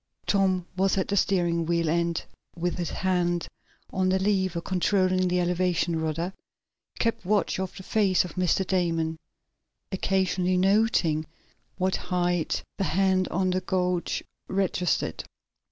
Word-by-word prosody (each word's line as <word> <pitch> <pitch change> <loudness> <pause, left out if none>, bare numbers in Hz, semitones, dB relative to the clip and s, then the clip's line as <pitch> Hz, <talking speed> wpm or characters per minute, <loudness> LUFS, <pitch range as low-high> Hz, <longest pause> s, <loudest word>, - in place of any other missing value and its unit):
Tom 190 -3 +2
was 190 +1 +2
at 190 - 0
the 200 - +1
steering 175 -4 +1
wheel, 170 -1 +1
and, 170 +1 0 0.3
with 175 +1 -2
his 175 - -1
hand 175 -2 0 0.5
on 185 0 +1
the 190 - +3
lever 190 -3 +1
controlling 185 +1 +1
the 180 0 +1
elevation 175 -1 +1
rudder, 165 +4 -2 0.6
kept 230 -1 0
watch 200 0 +1
of 190 -1 -4
the 190 - -8
face 195 -3 +2
of 175 - -8
Mr. 185 +1 +1
Damon, 165 -3 0 0.7
occasionally 185 -1 +1
noting 185 -5 +2 0.5
what 185 0 +1
height 175 -2 -1 0.2
the - - +2
hand 185 +2 +2
on 185 +1 0
the 185 +1 0
gauge 180 -2 -1 0.2
registered. 190 -3 0
185 Hz, 135 wpm, -27 LUFS, 175-190 Hz, 0.7 s, the